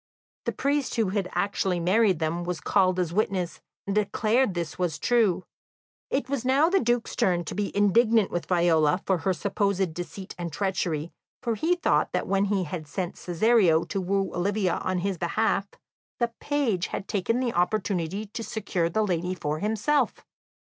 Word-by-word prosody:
The - - 0
priest 280 0 -1
who 225 -5 +1
had 195 -1 -1
actually 190 -3 0
married 190 +2 +3
them 160 +2 -1
was 175 -2 -3
called 185 +2 +2
as 175 -2 -1
witness, 190 -3 -1 0.2
and 200 - -2
declared 210 +2 +1
this 170 -1 -4
was 175 -5 0
true. 215 -7 +2 0.7
It 270 -1 -1
was 275 -3 -2
now 275 +5 +4
the 390 - +4
Duke's 240 0 0
turn 175 -2 +2
to - - -5
be 205 -1 -2
indignant 220 +1 +4
with 175 - -3
Viola 170 -1 +3
for 190 -3 +1
her 190 - 0
supposed 195 -2 0
deceit 175 +3 -7
and 170 -1 -4
treachery, 170 -4 -2 0.3
for 235 -2 0
he 320 - +1
thought 355 - +1
that - - 0
when 195 +1 +1
he 200 -2 0
had 160 -1 -6
sent 175 +4 -4
Cesario 180 -2 +3
to 195 - -3
woo 195 +1 -1
Olivia 190 0 0
on 185 0 -2
his 195 -4 -2
behalf, 200 +3 0 0.5
the 240 - +2
young 235 - -10
page 255 -12 0
had 195 - -5
taken 215 +4 0
the 250 -2 -1
opportunity 185 +1 0
to 215 +3 -6
secure 195 -5 -1
the 215 +5 +1
lady 180 -1 -1
for 150 -3 -3
himself. 220 - 0
195 Hz, 175 wpm, -26 LUFS, 175-220 Hz, 0.7 s, now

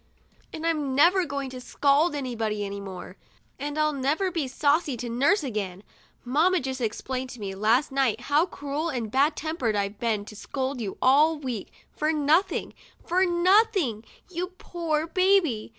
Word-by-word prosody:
And 320 0 -6
'm 300 -5 0
never 350 +6 +5
going 280 -3 -4
to 255 -1 -8
scold 285 +5 +2
anybody 225 -6 -2
any 200 0 -5
more, 190 -1 -8 0.4
and 290 +2 -4
I'll 305 0 +2
never 295 +8 0
be 325 -6 -1
saucy 285 +1 +1
to 240 +1 -5
nurse 280 - +2
again, 205 -7 -4 0.4
lamma 325 +9 +3
just 265 -2 -4
explained 255 +3 -3
to 250 - -10
me, 195 -2 -4
last 225 +8 +2
jht, 260 -5 +1
how 295 +7 +2
cruel 290 +1 -4
and 240 -5 -4
ad 290 +3 +3
tempered 295 -9 -1
I've 200 0 -2
been 220 -3 -1
to 215 - -11
scold 260 +3 -4
you 200 -4 -4
all 300 +5 +5
week 255 -8 -5 0.2
for 305 +1 0
nothing 310 +4 +1 0.2
— - - -29
for 365 +2 +2
nothing, 350 - +3 0.2
you 360 0 -3
poor 320 -4 -2
baby! 360 - +2
280 Hz, 165 wpm, -26 LUFS, 235-320 Hz, 0.4 s, never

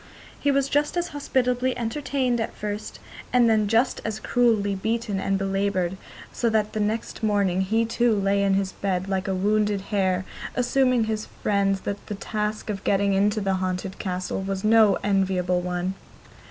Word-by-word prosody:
He 285 - +1
was 275 -1 +2
just 290 +4 0
as 350 0 -1
hospitably 255 -3 0
entertained 250 0 -1
at 225 - -4
first, 210 0 -5 0.3
and 245 -2 +5
then 215 -2 +3
just 230 +5 +2
as 220 0 -3
cruelly 220 -4 +2
beaten 220 +1 -2
and 195 0 0
belaboured, 195 -2 0 0.4
so 235 - +1
that 215 -1 0
next 215 +2 -2
morning 200 -4 +1
he 220 +4 +1
too 230 0 +2
lay 200 0 +2
in 195 -1 +3
his 195 -1 0
bed 190 -1 -2
like 190 -1 -1
a 190 - 0
wounded 205 +1 +1
hare, 190 -2 +1 0.3
assuring 250 -1 +2
his 220 -1 -3 0.2
friends 195 -2 +1
that 200 0 -4
the 210 - -4
task 215 +1 -3
of 195 -2 -6
getting 200 0 +2
into 205 +2 +2
the 195 -1 0
haunted 185 +1 -3
castle 185 0 -3
was 195 0 -3
no 215 -2 +5
enviable 185 -3 +1
one. 180 +1 -2
205 Hz, 165 wpm, -25 LUFS, 195-230 Hz, 0.4 s, and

